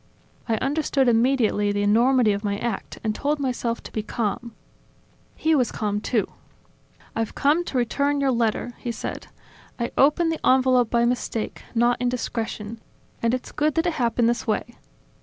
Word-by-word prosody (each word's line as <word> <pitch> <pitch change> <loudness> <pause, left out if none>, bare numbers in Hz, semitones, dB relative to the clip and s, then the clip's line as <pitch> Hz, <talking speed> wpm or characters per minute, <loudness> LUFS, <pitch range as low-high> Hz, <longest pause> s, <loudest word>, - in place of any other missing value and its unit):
I 225 - +3
understood 275 +1 +1
immediately 230 -3 +3
the 205 0 0
enormity 235 +2 +4
of 200 +1 -4
my 200 -1 -1
act 230 -2 -4
and 215 -1 0
told 290 +5 -1
myself 245 -3 -2
to - - -10
be 215 - -2
calm. 230 +1 -3 0.8
He 320 - +1
was 255 -6 +2
calm, 210 -1 -2
too. 220 -3 +1 0.9
"I've 225 -1 -2
come 300 +5 +3
to 265 - -3
return 280 +4 +1
your 275 -1 +2
letter," 235 0 0
he 240 - -3
said. 230 - -6 0.5
"I 235 -1 -2
opened 315 +4 +4
the 320 - -5
envelope 255 -2 +4
by 235 0 +2
mistake, 240 -2 -2
not 240 +1 +2
indiscretion; 230 -3 -3 0.4
and 230 +2 +2
it's 255 - -7
good 300 0 0
that 325 - +1
it 345 - +1
happened 235 -3 +1
this 235 0 -1
way. 225 +2 -1
240 Hz, 165 wpm, -24 LUFS, 225-270 Hz, 0.9 s, enormity